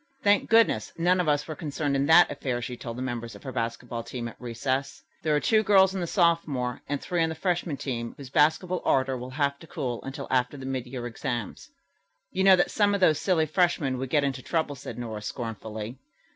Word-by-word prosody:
"Thank 205 0 +3
goodness, 225 0 +4
none 180 +2 +3
of 180 - 0
us 145 0 +1
were 160 - -4
concerned 145 -2 -2
in 140 +1 +1
that 170 +3 +7
affair," 130 -3 -2
she 125 +1 -5
told 115 -1 -7
the 130 - -3
members 120 -2 -4
of - - -13
her 135 - -5
basketball 115 0 -3
team 120 0 -5
at 115 - -9
recess. 130 +3 -3 0.2
"There 155 -1 +1
are - - +3
two 220 +7 +3
girls 195 -3 +5
on 190 - -3
the 170 - -2
sophomore 160 -9 +1
and 145 -1 -1
three 175 +3 -1
on 160 - +2
the 160 - -4
freshman 175 -3 -1
team 120 -4 -4
whose 135 -2 -10
basketball 160 +5 +2
ardor 130 0 +2
will 125 0 -6
have 140 +1 -1
to 165 - -13
cool 130 -7 -4
until 135 +1 -6
after 125 +2 +1
the 135 - -8
mid 130 -2 -3
year 125 -1 -6
exams." 120 -2 -4 0.6
"You 190 - 0
might 195 - +6
know 190 - +9
that 175 - +1
some 205 -1 +3
of - - -1
those 160 -5 +4
silly 175 -5 +2
freshmen 155 -5 +1
would 130 0 -4
get 145 0 +3
into 135 -2 -1
trouble," 155 0 -1
said 135 - -8
Nora 110 -3 -5
scornfully. 110 +1 -6
140 Hz, 225 wpm, -27 LUFS, 125-165 Hz, 0.6 s, know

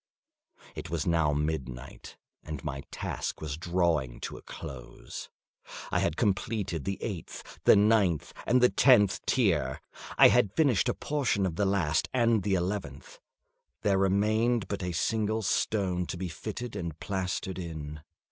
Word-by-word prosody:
It - - -7
was 85 -2 -2
now 80 -3 +2
midnight, 70 -4 -4 0.2
and 75 -2 -7
my 70 -2 -4
task - - -4
was 75 -3 -4
drawing 85 -7 0
to - - -5
a - - -10
close. 60 -5 -9 0.6
I - - +2
had - - 0
completed 95 - -1
the 100 - -2
eighth, 95 -8 -7
the - - +8
ninth, 100 -6 +3
and 125 +1 +4
the 125 - +6
tenth 105 -8 +5
tier. 80 - +1 0.4
I - - +9
had 100 -1 +2
finished 130 -6 +3
a - - 0
portion 135 -9 0
of 85 -4 -2
the 100 - +1
last 90 -6 +1
and 115 -3 +3
the 100 0 +1
eleventh; 90 -6 -4 0.6
there 100 -2 +3
remained 105 +3 +2
but 100 0 -3
a 90 -1 -2
single 110 +5 0
stone 95 -3 0
to - - -4
be 90 0 -4
fitted 110 +8 -6
and 85 -3 -5
plastered 95 0 -3
in. 75 -3 -6
95 Hz, 150 wpm, -29 LUFS, 80-105 Hz, 0.6 s, I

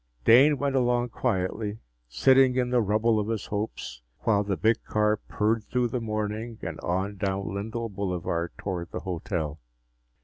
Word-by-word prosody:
Dane 140 +5 +7
went 140 0 -1
along 120 -1 +2
quietly, 105 +1 -1 0.3
sitting 130 - +5
in 125 -1 0
the 125 -1 +4
rubble 110 +2 +2
of 105 - -2
his 110 -2 -2
hopes 105 - -4 0.2
while 105 -2 +2
the 100 -2 -2
big 110 +1 +2
car 105 0 +1
purred 110 +2 -1
through 125 +1 0
the 120 +1 -2
morning 110 +1 -3
and 85 -1 -5
on 95 +3 -2
down 95 0 -2
Lindell 110 +4 -3
Boulevard 90 -4 -2
toward 90 -3 -4
the - - -5
hotel. 85 -4 -3
105 Hz, 160 wpm, -27 LUFS, 95-115 Hz, 0.3 s, Dane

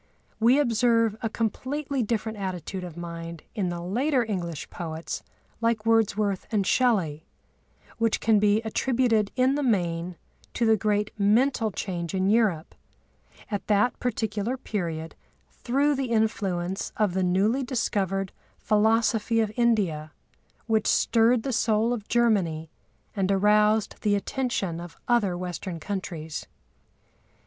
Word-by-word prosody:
We 235 +4 +5
observe 230 -4 +2
a 225 - -1
completely 265 +6 -2
different 220 -1 -2
attitude 185 -1 -4
of 175 -2 -8
mind 170 -1 -7
in 195 -5 -1
the 175 -1 -4
later 250 - +1
English 175 -7 -4
poets 160 -1 -5 0.4
like 230 -2 +1
Wordsworth 215 -3 +1
and 205 -3 +1
Shelley, 185 - +1 0.7
which 230 -1 +2
can 220 -1 +3
be 210 +2 +3
attributed 225 -2 +1
in 260 +1 +3
the 290 - -1
main 175 -7 0 0.4
to 235 - +1
the 220 0 +5
great 210 0 0
mental 225 +3 +3
change 180 -3 -4
in 190 +1 +2
Europe, 205 -8 +1 0.8
at 205 - -3
that 210 +4 +2
particular 220 0 -2
period, 165 -9 -4 0.4
through 280 +4 +1
the 270 -3 -2
influence 195 -5 -1
of 210 -4 +1
the 190 - 0
newly 195 +8 +2
discovered 195 -7 -1 0.3
philosophy 220 +1 +2
of 220 -2 +1
India 190 -11 +1 0.5
which 220 -2 +1
stirred 230 0 +3
the 265 - -2
soul 225 +1 +2
of 215 -4 -5
Germany 185 -10 +1 0.4
and 195 -1 +1
aroused 210 +2 +3
the 205 -1 +2
attention 200 -6 -2
of 175 -1 -10
other 215 -7 +2
Western 180 -1 -5
countries. 160 -4 -5
210 Hz, 130 wpm, -26 LUFS, 185-230 Hz, 0.8 s, We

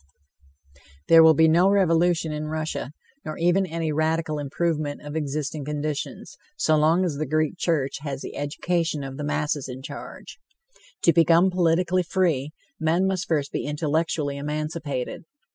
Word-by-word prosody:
There 165 0 +9
will 160 -1 +7
be 160 +2 +5
no 175 +4 +4
revolution 175 -4 +2
in 150 0 -4
Russia, 155 -3 -3 0.3
nor 155 - -6
even 175 +3 +2
any 165 -1 -2
radical 155 0 0
improvement 150 0 -2
of 150 +1 -6
existing 150 0 -3
conditions, 150 0 -4 0.2
so 155 - +3
long 160 +4 +3
as 155 -5 -2
the 155 0 -2
Greek 155 +4 0
Church 145 -6 0
has 140 -2 -5
the - - -7
education 155 +1 -1
of 135 0 -7
the 150 - -4
masses 145 -1 -2
in 130 +1 -8
charge. - - -9 0.6
To 170 - +5
become 170 +3 +5
politically 180 +1 +2
free, 165 -6 0 0.3
men 165 +4 +2
must 190 -1 -1
first 145 -4 0
be - - -3
intellectually 150 -1 -1
emancipated. 150 -1 -4
155 Hz, 150 wpm, -24 LUFS, 145-170 Hz, 0.6 s, There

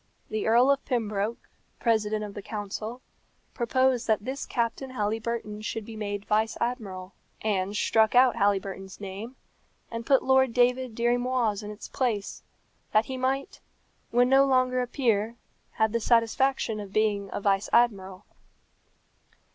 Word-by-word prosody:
The 215 0 -1
Earl 240 +5 +5
of 280 0 0
Pembroke, 220 -3 -2 0.3
President 215 -2 +1
of 205 -1 -7
the 205 - -7
Council, 215 +4 -6 0.5
proposed 255 0 +1
that 215 -2 +1
this 265 +2 -4
Captain 235 +2 -2
Halyburton 215 -1 -3
should 220 0 -4
be 225 - -9
made 205 -1 -4
vice 215 +1 +1
admiral. 200 -6 -4 0.3
Anne 200 -2 0
struck 220 +2 +2
out 250 0 +6
Halyburton's 195 -2 -1
name, 205 +5 -7 0.6
and 230 0 -4
put 270 +2 +3
Lord 265 -2 +3
David 250 -1 +2
Dirry 240 +1 +2
Moir's 245 -4 0
in 210 - -7
its 210 0 -8
place, 225 -7 -2 0.5
that 215 +1 +4
he 265 - -5
might, 265 +2 -2 0.5
when 245 +1 +3
no 270 +1 +6
longer 255 -1 +2
a 250 - -2
peer, 230 -4 0 0.4
have 220 0 +1
the 235 - 0
satisfaction 230 0 +2
of 200 -2 -8
being 205 -2 +1
a - - -3
vice 195 -1 +1
admiral. 195 -5 +1
225 Hz, 145 wpm, -27 LUFS, 210-250 Hz, 0.6 s, out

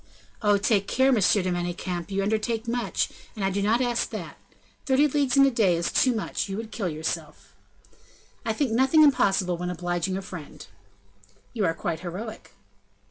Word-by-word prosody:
"Oh! 205 -2 +4
take 200 -1 +1
care! 265 +1 +3
Monsieur 205 -4 +3
de 185 - -1
Manicamp; 175 0 -3
you 195 0 -1
undertake 220 +2 -1
much, 240 +1 -1 0.3
and 205 -3 -2
I 195 - +1
do 200 +1 -1
not 220 +5 +2
ask 240 -2 0
that. - - -7 0.5
Thirty 275 +2 +4
leagues 280 -2 +1
in 275 - +7
a 275 - +3
day 205 -7 +3
is 170 0 -1
too 255 - +3
much, 210 -1 -3
you 195 - -3
would 225 0 -6
kill 195 -6 -2
yourself." 155 0 -5 0.9
"I 225 - -1
think 245 +2 -1
nothing 265 +7 +5
impossible 195 - +3
when 180 +1 -3
obliging 175 +1 -2
a 195 - -5
friend." 180 -5 -9 0.9
"You 220 -5 0
are 165 -1 +1
quite 165 -1 -3
heroic." 190 +6 -7
200 Hz, 180 wpm, -26 LUFS, 180-235 Hz, 0.9 s, in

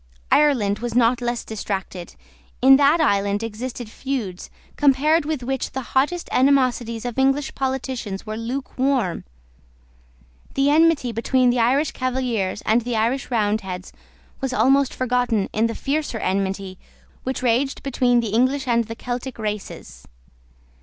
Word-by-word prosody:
Ireland 240 -9 +3
was 240 -1 -4
not 245 0 +3
less 240 -1 -2
distracted. 195 -4 -5 0.4
In 265 +1 +7
that 290 +4 +4
island 200 -7 +1
existed 235 +2 -5
feuds, 220 -6 -5 0.3
compared 295 +3 +3
with 300 -4 -3
which 265 +1 -3
the 265 - -3
hottest 295 +7 +1
animosities 250 -4 +2
of 245 +1 -3
English 270 +1 +1
politicians 260 -7 -3
were 215 0 -5
lukewarm. 255 -3 -2 1.3
The 275 +1 +3
enmity 315 -5 +3
between 245 +2 +2
the 245 - 0
Irish 270 +6 +2
Cavaliers 245 -7 -2
and 225 +3 +2
the 240 0 -3
Irish 235 +5 0
Roundheads 205 -5 -2 0.5
was 270 -2 -2
almost 270 +1 +3
forgotten 245 -5 0
in 220 +2 +2
the 230 - -5
fiercer 290 -4 -2
enmity 195 -1 -2 0.4
which 260 0 -4
raged 255 +3 +1
between 245 -3 +2
the 230 - -3
English 260 +6 +1
and 235 -1 +2
the 225 +1 -7
Celtic 245 +1 -5
races. 210 -2 -6
245 Hz, 135 wpm, -22 LUFS, 220-270 Hz, 1.3 s, In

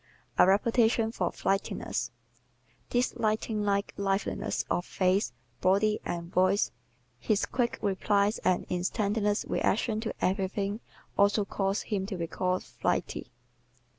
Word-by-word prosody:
A - - +8
Reputation 225 +3 +3
for 180 -6 -1
Flightiness 195 - -1 0.8
¶ - - -39
This 245 +1 +1
lightning 215 -1 0
like 200 -1 0
liveliness 195 0 -1
of 175 - 0
face, 190 +2 +1 0.3
body 205 +3 +3
and 170 0 -4
voice, 185 +2 +3 0.5
his 200 - +1
quick 245 -2 -1
replies 200 +1 +2
and 185 - +1
instantaneous 205 +3 0
reactions 220 +1 +1
to - - -2
everything 195 +2 0 0.4
also 200 +1 +4
cause 195 0 -1
him 195 -3 -2
to 195 -3 -4
be 170 - -2
called 185 +2 -1
"flighty." - - -2
200 Hz, 125 wpm, -29 LUFS, 190-215 Hz, 0.8 s, A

